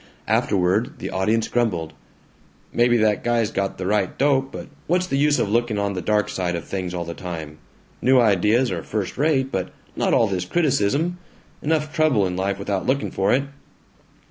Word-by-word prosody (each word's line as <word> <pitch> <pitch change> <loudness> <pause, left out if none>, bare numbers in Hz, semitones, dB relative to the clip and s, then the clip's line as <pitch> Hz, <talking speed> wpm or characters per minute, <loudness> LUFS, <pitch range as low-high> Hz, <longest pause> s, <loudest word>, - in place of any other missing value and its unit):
Afterward 105 - +1
the - - -5
audience 110 +4 +1
grumbled, 90 -10 -1 0.8
"Maybe 120 0 +4
that 110 -2 +2
guy's 120 -3 +1
got 100 0 -2
the 90 - -4
right 100 -1 0
dope, 135 -1 +2
but - - -7 0.2
what's 180 +2 +2
the 160 - -2
use 145 +1 +3
of - - +1
looking 120 -1 +1
on 100 0 -1
the 90 - -3
dark 105 +3 +1
side 90 -2 -2
of 85 - -4
things 90 -2 -4
all 85 -1 -3
the 85 - -5
time? 80 -4 -7 0.4
New 130 0 +5
ideas 110 +3 +3
are 85 -3 -3
first 105 0 -3
rate, 135 -2 +1
but 95 -2 -2 0.3
not - - 0
all 115 - +4
this 95 -4 -2
criticism. 155 - +1 0.4
Enough 155 0 0
trouble 150 -11 +3
in 90 -1 -2
life 95 +1 -1
without 100 0 -3
looking 135 +2 0
for 95 - +1
it!" 135 +2 +3
105 Hz, 185 wpm, -22 LUFS, 95-130 Hz, 0.8 s, New